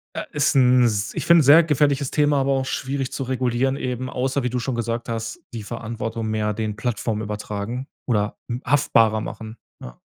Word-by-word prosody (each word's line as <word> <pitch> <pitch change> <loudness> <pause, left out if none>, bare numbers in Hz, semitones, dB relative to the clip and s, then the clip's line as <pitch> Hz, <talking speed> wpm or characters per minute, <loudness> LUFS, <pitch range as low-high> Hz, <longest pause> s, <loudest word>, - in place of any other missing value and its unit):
äh, - - -2
ist 145 +1 +2
'n 125 -1 +5
s 105 -1 0
ich - - -3
finde, 170 -1 +7
sehr 150 +5 +8
gefährliches 145 -3 +1
Thema. 145 -1 +2
Aber 135 +1 +1
auch 135 -1 +1
schwierig 135 0 -3
zu 135 - -4
regulieren 130 +1 0
eben, 130 -1 -3
außer 130 +2 -1
wie 125 - -1
du 125 - -2
schon 120 +1 -2
gesagt 115 0 -3
hast, 115 0 -4
die 115 - -5
Verantwortung 115 0 -5
mehr 110 -1 0
den 105 -1 -3
Plattform 110 -1 -2
übertragen 105 +4 -4 0.2
oder 105 -4 0
m 120 +1 -3
haftbarer 115 -5 +3
machen, 110 +1 -7 0.2
ja. - - -10
120 Hz, 190 wpm, -22 LUFS, 110-135 Hz, 0.2 s, sehr